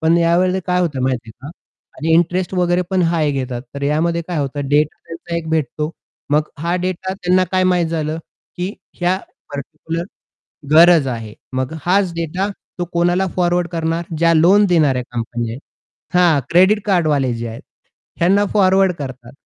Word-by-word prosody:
पण 160 +1 +3
यावेळेला 180 +2 +2
काय 180 0 +1
होतं 145 -7 -1
माहिती 125 -3 -1
आहे 120 +5 -12
का? - - -7 0.5
आणि 160 +1 0
इंटरेस्ट 175 +3 +2
वगैरे 180 0 +2
पण 185 -1 +2
हाय 155 -3 +1
घेतात. 130 -3 -3
तर 140 - -6
यामध्ये 165 +4 +1
काय 175 - -2
होतं 140 0 -3
डेटा 150 +1 +2
त्यांचा 170 +1 -6
एक 160 -1 -4
भेटतो. 155 0 -1 0.4
मग 150 +1 +2
हा 170 +3 -1
डेटा 185 +1 -3
त्यांना 185 -1 +2
काय 185 0 +3
माहित 180 -2 +2
झालं 160 -1 -2 0.4
की 180 +3 -3 0.3
ह्या 175 +1 +2 0.4
पार्टिक्युलर 160 +4 -5 0.7
गरज 165 -2 +7
आहे. 115 -4 -5 0.2
मग 130 +2 -2
हाच 185 0 +2
डेटा 170 +4 -2 0.3
तो 175 - 0
कोणाला 175 +2 +2
फॉरवर्ड 175 -1 +1
करणार 165 0 -1
ज्या 165 0 +4
लोन 185 +6 +5
देणाऱ्या 145 -7 +3
कंपन्या 120 -1 -3
आहेत. 125 - -8 0.6
हां, 170 -5 +4
क्रेडिट 190 +5 +5
कार्ड 180 -5 +2
वाले 135 -4 +1
जे 115 0 -4
आहेत 115 - -8 0.6
ह्यांना 195 +4 +4
फॉरवर्ड 190 -2 +4
करतात. 130 -3 -8
165 Hz, 165 wpm, -18 LUFS, 145-180 Hz, 0.7 s, गरज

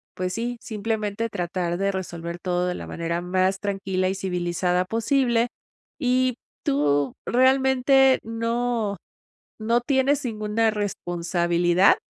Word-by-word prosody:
pues, 185 0 -2
sí, 240 +2 -3
simplemente, 220 -1 -2
tratar 175 -3 -2
de 195 +1 +1
resolver 170 -2 -5
todo 180 -1 0
de 180 - -1
la - - -7
manera 170 +1 -3
más 185 +2 +1
tranquila 190 -2 -1
y 190 - -2
civilizada 180 -1 0
posible. 235 +3 +1 0.5
Y 255 -2 +2 0.3
tú, 145 -1 +1
realmente, 265 +1 +4
no 230 -2 -1 0.6
no 230 +2 +2
tienes 270 +2 +1
ninguna 220 -1 0
responsabilidad 175 -3 +2
200 Hz, 115 wpm, -24 LUFS, 180-235 Hz, 0.6 s, realmente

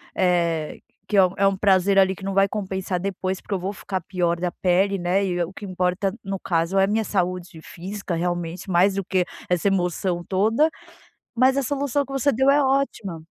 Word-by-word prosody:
eh, 170 -4 0 0.3
que 210 - -2
é 190 - +7
um 180 - -3
é 200 - +4
um 195 - +2
prazer 195 0 +3
ali 190 -1 +5
que 190 - -13
não 195 - -2
vai 195 0 +4
compensar 190 -3 -3
depois 190 0 -3
porque - - -5
eu 195 - 0
vou 190 +2 -3
ficar 190 -2 -4
pior 175 -1 -1
da 180 0 -1
pele, 190 +3 +1
né, 180 +2 +1
e 190 - -1
e 175 - +1
o 170 +3 -7
que 205 - -11
importa 185 +1 -1
no 195 0 -3
caso 170 +2 0
é 195 - +5
a - - +3
minha 220 +2 +1
saúde 180 -4 -2
física, 195 0 -6
realmente, 175 +2 -3
mais 185 +2 +3
do 195 - -1
que 185 -1 +1 0.2
essa 180 +2 +1
emoção 180 -1 -1
toda. 220 +11 +2 0.7
Mas 260 +2 +4
a - - +3
solução 285 +1 0
que 270 - -12
você 275 +1 +2
deu 265 +2 +2
é 285 +1 +5
ótima. 225 -12 -1
190 Hz, 215 wpm, -23 LUFS, 180-200 Hz, 0.7 s, é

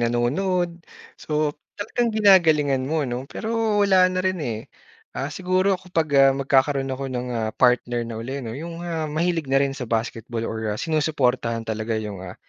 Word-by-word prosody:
nanonood, 170 +10 0 0.4
so 150 -1 0 0.2
talagang 235 +3 -1
ginagalingan 160 -10 +4
mo 155 -1 0
'no. 125 +1 -4
Pero 220 -2 0
wala 190 -2 +5
na 185 0 -1
rin 185 -1 0
eh. 115 -7 -2 0.6
Ah, 140 +2 -3
siguro 185 +4 +1
kapag, 175 -4 -2
ah, 135 0 +7
magkakaroon 135 0 +1
ako 135 +1 -3
ng, 125 -1 -4
ah, 110 -1 -1
partner 120 -1 +2
na 115 - -5
uli 130 +5 -4
'no 115 -3 -6
'yung, 165 +2 -7
ah, 170 -2 -3
mahilig 165 0 0
na 135 - +5
rin 140 -1 0
sa 125 - -4
basketball 115 0 -3
or, 110 -1 -3
ah, 105 - -5
sinusuportahan 130 -8 0
talaga 110 +1 -2
'yung, 105 -4 -6
ah, 90 - -8
140 Hz, 175 wpm, -23 LUFS, 120-175 Hz, 0.6 s, ah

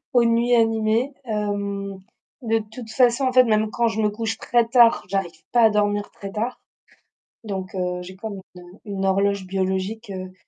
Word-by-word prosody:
aux 245 -2 +5
nuits 235 +1 +3
animées, 225 +3 +2
hem, 200 -3 -3 0.4
de 225 -1 +1
toute 225 -1 -9
façon, 245 +2 +3
en 255 - +1
fait, 255 0 +7
même 215 -1 +1
quand 235 +1 +1
je 220 -1 -2
me 210 - +3
couche 225 +1 -3
très 240 -1 +2
tard, 235 -1 +5
j'arrive 180 -5 -3
pas 240 - +4
à 220 - +6
dormir 205 -1 0
très 195 - -8
tard. 230 +4 -3 0.8
Donc, 190 -3 -5
heu, 180 -1 -2
j'ai 185 +1 -10
comme 200 0 -6
une, 180 - -12
heu, 175 +3 -15
une 195 -2 -4
horloge 200 0 +1
biologique, 190 +3 -2
heu, 185 0 -7
210 Hz, 185 wpm, -23 LUFS, 195-230 Hz, 0.8 s, fait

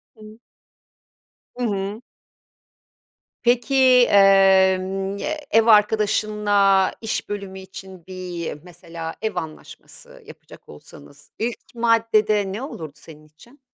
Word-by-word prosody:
Hı. 215 0 -14 1.2
Hı 250 - -5
hı. 200 0 -4 1.4
Peki, 240 +2 +1 0.3
emm, 195 0 +3
eee, 305 +6 -5
ev 225 0 +4
arkadaşınla 210 -2 +2
iş 220 -1 -4
bölümü 200 -2 -6
için 190 -2 -12
bir 180 -3 -6
mesela 170 -2 -9
ev 220 -3 -3
anlaşması 160 -3 -10
yapacak - - -16
olsanız, 75 -1 -16
ilk 235 +1 -3 0.2
maddede 220 -3 +1
ne 205 +5 -6
olurdu 160 - -8
senin 155 -1 -16
için? 235 - -21
200 Hz, 100 wpm, -21 LUFS, 185-220 Hz, 1.4 s, ev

